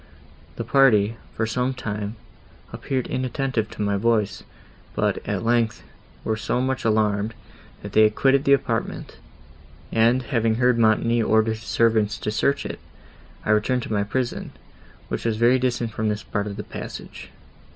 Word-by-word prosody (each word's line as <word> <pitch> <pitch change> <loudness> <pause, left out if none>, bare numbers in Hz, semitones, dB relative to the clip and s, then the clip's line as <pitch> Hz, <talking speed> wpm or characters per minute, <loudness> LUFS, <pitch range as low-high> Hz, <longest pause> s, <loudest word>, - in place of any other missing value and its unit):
The - - -4
party, 115 -5 +4 0.2
for 110 - 0
some 125 +4 -1
time, 105 -2 -4 0.6
appeared 130 -2 -2
inattentive 130 -4 -2
to 105 - -4
my 100 -1 +1
voice; 105 -2 +1 0.5
but, - - +1
at - - -2
length, 115 -2 +1 0.4
were 110 - 0
so 110 +3 -1
much 130 +1 -1
alarmed, 110 0 +1 0.5
that - - -7
they 110 0 +6
quitted 135 +5 +2
the 140 - +5
apartment; 115 -4 -1 0.7
and, 120 +3 +3
having 115 -1 +1
heard 125 0 +3
Montoni 115 +1 +3
order 110 0 +3
his 110 0 -5
servants 110 -2 +1
to 105 - -3
search 140 +6 +1
it, - - -5 0.7
I - - +2
returned 120 +4 +2
to - - -4
my 100 - +2
prison, 120 +4 -3 0.5
which - - -4
was 115 -2 0
very 120 +3 +4
distant 120 -2 -1
from 110 0 -1
this 105 0 -3
part 105 -1 -3
of 100 - -6
the - - -4
passage." - - -8
115 Hz, 160 wpm, -23 LUFS, 110-125 Hz, 0.7 s, they